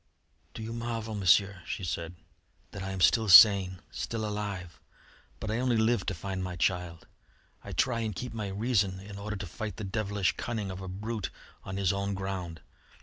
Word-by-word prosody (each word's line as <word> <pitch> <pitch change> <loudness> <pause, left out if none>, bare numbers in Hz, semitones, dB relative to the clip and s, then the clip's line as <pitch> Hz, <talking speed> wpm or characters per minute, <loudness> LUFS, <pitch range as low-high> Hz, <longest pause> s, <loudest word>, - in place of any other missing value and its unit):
"Do 110 - -6
you 115 +1 -5
marvel, 115 -1 -4
Monsieur," 100 -1 +3
she - - -4
said, 85 0 -3 0.6
"that 100 - -7
I 95 - -4
am 95 -1 -4
still 110 +3 +4
sane 95 -1 +8
still 110 -2 -3
alive? 100 -4 -5 0.6
But 110 - -3
I 110 - 0
only 125 -2 +2
live 110 -3 +2
to 100 - -1
find 95 +2 -4
my 90 -1 -4
child. 90 -1 -1 0.6
I - - -8
try 120 -3 +1
and 110 -3 -2
keep 125 +5 -5
my 110 -3 -3
reason 100 -2 0
in 100 +1 -9
order 105 +1 -4
to 100 0 -5
fight 105 +2 -6
the - - -5
devilish 100 -1 0
cunning 110 -5 -3
of 95 +1 -7
a 95 - -6
brute 100 -1 -4 0.3
on 95 0 -5
his 100 -1 +2
own 100 0 -2
ground. 95 -4 -4
100 Hz, 190 wpm, -29 LUFS, 95-110 Hz, 0.6 s, sane